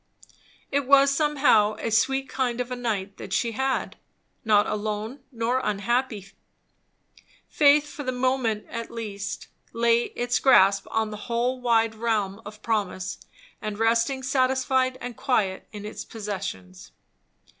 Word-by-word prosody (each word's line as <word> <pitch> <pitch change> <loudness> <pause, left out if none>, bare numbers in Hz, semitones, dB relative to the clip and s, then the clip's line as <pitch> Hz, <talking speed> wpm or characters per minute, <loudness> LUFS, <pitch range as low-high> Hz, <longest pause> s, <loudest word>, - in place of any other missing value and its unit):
It 280 -1 0
was 275 0 +6
somehow 275 -8 +3
a 230 - -3
sweet 270 +4 +2
kind 250 -3 -2
of 250 0 -3
a - - -1
night 205 -5 -3
that - - -9
she 235 - +1
had; 265 +3 -2 0.5
not 210 -2 +4
alone 215 +4 -3
nor 240 +1 0
unhappy; 215 0 -1 1.2
faith, 295 0 +4
for 290 - -8
the 260 -2 -2
moment 250 -4 0
at 230 0 -6
least, 205 -4 -5 0.3
laying 235 0 +2
its 245 0 0
grasp 195 -6 +5
on 220 -1 -1
the 210 - -6
whole 245 +2 0
wide 225 -2 +2
realm 220 -2 -1
of 210 0 -12
promise 200 -5 -2 0.4
and 215 -1 -4
resting 230 +4 +1
satisfied 260 0 +1
and 245 -1 -6
quiet 205 -8 0
in 210 -1 -8
its 210 - -6
possessions. 185 - -7
230 Hz, 135 wpm, -25 LUFS, 210-260 Hz, 1.2 s, was